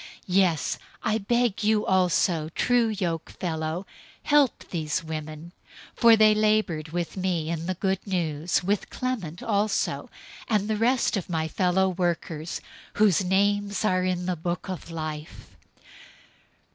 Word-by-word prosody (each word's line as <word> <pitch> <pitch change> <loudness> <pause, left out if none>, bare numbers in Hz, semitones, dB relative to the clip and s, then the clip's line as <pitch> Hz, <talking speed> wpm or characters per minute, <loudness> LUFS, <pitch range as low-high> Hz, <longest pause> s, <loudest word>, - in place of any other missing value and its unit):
004:003 - - -12 0.2
Yes, 180 -4 +2 0.3
I 220 0 +1
beg 235 0 0
you 215 0 +2
also, 180 -3 +2
true 245 -2 +3
yokefellow, 170 -3 -3 0.4
help 290 -5 +2
these 155 -3 -2
women, 155 +1 -6 0.4
for 230 -1 +6
they 215 -1 +6
labored 210 -7 +1
with 170 0 -3
me 180 -4 -1
in 165 0 -3
the 185 - -1
Good 190 +2 -2
News, 170 -3 0
with 200 +2 -1
Clement 210 -11 -4
also, 210 -1 0 0.4
and 210 -2 +1
the 220 - 0
rest 235 +1 +2
of 185 - -5
my 160 -2 -1
fellow 185 +3 +2
workers, 170 -3 -2 0.3
whose 205 -3 +3
names 200 +2 +1
are 185 -2 +2
in 180 -1 -1
the 180 0 0
book 175 +3 -4
of 185 -2 -6
life. 155 -2 -7
185 Hz, 135 wpm, -26 LUFS, 165-210 Hz, 0.4 s, for